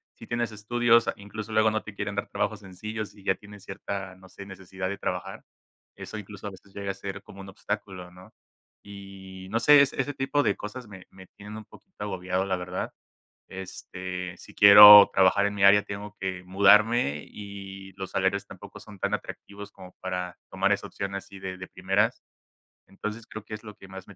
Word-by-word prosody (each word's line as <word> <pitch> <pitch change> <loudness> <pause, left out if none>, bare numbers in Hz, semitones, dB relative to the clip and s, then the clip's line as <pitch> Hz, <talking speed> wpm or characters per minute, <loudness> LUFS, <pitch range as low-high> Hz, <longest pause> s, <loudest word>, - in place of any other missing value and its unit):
si - - -12
tienes 120 -1 -2
estudios, 115 +2 +2
incluso, 105 +2 -8
luego 110 0 +4
no 110 - -2
te 105 - -9
quieren 100 0 -4
dar 100 - -2
trabajos - - -2
sencillos, 105 +3 -7
y 100 - -17
ya 95 - +1
tienes, 105 -1 -14
cierta, 95 -1 -6
no 95 0 -17
sé, 100 - -11
necesidad 95 -1 -6
de 100 - -4
trabajar. - - -5 0.5
Eso 110 - -8
incluso, 105 0 -9
a - - -3
veces 95 +1 -17
llega 100 -1 -4
a - - -6
ser 100 0 -7
como 100 - -12
un 95 - -10
obstáculo, 95 -2 -6
¿no? 90 +1 -16 0.5
Y, 95 -2 -11
no 115 +2 0
sé, 145 +4 +7
es 140 - +2
ese 140 +2 -2
tipo 140 +2 0
de 100 - +1
cosas, 115 +3 -8
me 95 -3 -12
me 95 0 -15
tienen 105 +1 -12
un 110 - -10
poquito 190 - -13
agobiado, 95 -1 -2
la 95 -1 -1
verdad. 90 0 -5 0.6
Este, 95 -1 -7
si - - -14
quiero 105 0 +11
trabajar 95 +1 +4
en 105 - -2
mi 100 -1 0
área, 100 +1 +7
tengo 100 +1 -8
que 95 -1 -4
mudarme, 100 - +4
y 100 -1 -10
los 95 -1 -7
salarios 95 +1 0
tampoco 100 +2 -12
son 105 -1 -13
tan 100 +1 -1
atractivos, 100 0 -8
como 90 0 -13
para 90 -1 -4
tomar - - 0
esa - - -1
opción, 100 0 -5
así 100 0 -9
de 95 -1 -6
de 95 - -8
primeras. 95 +5 0 0.7
Entonces, 105 +3 -7
creo 110 -1 -9
que - - -11
es 105 - -7
lo 105 -2 -10
que 95 - -15
más 95 -1 -10
me 100 - -14
100 Hz, 200 wpm, -26 LUFS, 95-105 Hz, 0.7 s, quiero